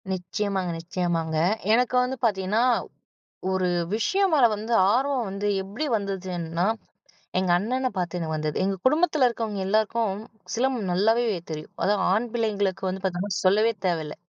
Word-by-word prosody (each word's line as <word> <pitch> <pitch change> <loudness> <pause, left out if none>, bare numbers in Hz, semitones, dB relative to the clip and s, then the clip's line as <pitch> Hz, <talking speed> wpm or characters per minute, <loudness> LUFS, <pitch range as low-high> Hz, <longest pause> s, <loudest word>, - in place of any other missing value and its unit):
நிச்சயமாங்க 190 +1 -2
நிச்சயமாங்க. 165 -2 -2 0.4
எனக்கு 250 +2 +2
வந்து 260 +1 -3
பாத்தீங்கன்னா, 205 +1 +1 0.9
ஒரு 185 -1 +1 0.3
விஷயம் 385 - +2
மேல 280 -5 +5
வந்து 220 +3 -5 0.2
ஆர்வம் 260 0 +1
வந்து 200 +1 -3 0.2
எப்டி 205 +10 -4
வந்ததுன்னா, 180 -4 -2 0.7
எங்கண்ணன 210 +9 +1
பாத்து 180 -1 -2
நான் 160 -1 -3
வந்தது. 155 -1 -2
எங்க 195 +1 0
குடும்பத்தில 300 -1 +4
இருக்கவங்க 225 -4 -3
எல்லாருக்கும், 215 0 +1 0.4
சிலம்பம் 245 -5 0
நல்லாவே 220 +6 +3 0.3
தெரியும். 155 0 -6
அதுவும் 200 -1 +2
ஆண் 225 +4 +1
பிள்ளைங்களுக்கு 205 -5 -1
வந்து 190 +1 -4
பாத்தீங்கன்னா 190 +2 -1
சொல்லவே 215 +5 +4 0.2
தேவையில்லை 160 -4 -2
200 Hz, 130 wpm, -25 LUFS, 180-230 Hz, 0.9 s, மேல